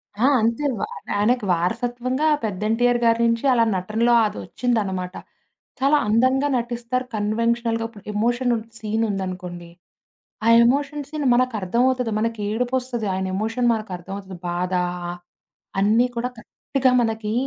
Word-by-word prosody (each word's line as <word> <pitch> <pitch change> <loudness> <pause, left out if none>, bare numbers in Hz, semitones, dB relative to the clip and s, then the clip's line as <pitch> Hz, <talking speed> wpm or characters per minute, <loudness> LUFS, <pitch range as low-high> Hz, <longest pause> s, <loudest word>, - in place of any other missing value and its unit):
ఆ! 220 +5 +1 0.2
అంతే 230 +6 0
వ - - -6 0.4
ఆయనకి 230 +2 +2
వారసత్వంగా 245 - -1 0.2
పెద్ద 205 -2 -3
'ఎన్టీఆర్' 240 +2 +2
గారి 230 0 +4
నుంచి 230 +3 +1
అలా 235 - +4
నటనలో 220 +6 +1
అది 210 - -3
ఒచ్చిందనమాట. 195 - -2 0.6
చాలా 280 +3 +4
అందంగా 255 +6 +3
నటిస్తారు. 240 +1 -2
కన్వెన్షనల్‌గా, 230 +2 0
ఇప్పుడు 210 -3 -15
ఎమోషన్ 240 +3 +1 0.2
సీన్ 220 +1 -1
ఉందనుకోండి. 180 -3 -5 0.8
ఆ - - +3 0.2
ఎమోషన్ 285 +3 0
సీన్ 300 -1 -3
మనకు 255 -2 +1
అర్థమవుతది. 245 +4 +1
మనకి 230 -1 -2
ఏడుపొస్తది. 245 -1 -1
ఆయన 190 0 -2
ఎమోషన్ 225 +4 0
మనకు 215 -3 -4
అర్థమవుతది. 190 +1 -8
బాధ. 180 +1 -2 0.3
ఆ 175 - -3 0.7
అన్నీ 220 +5 +4
కూడా 245 +2 -1
కరెక్ట్‌గా 260 +2 -1
మనకి, 220 -2 -2
230 Hz, 130 wpm, -22 LUFS, 210-245 Hz, 0.8 s, గారి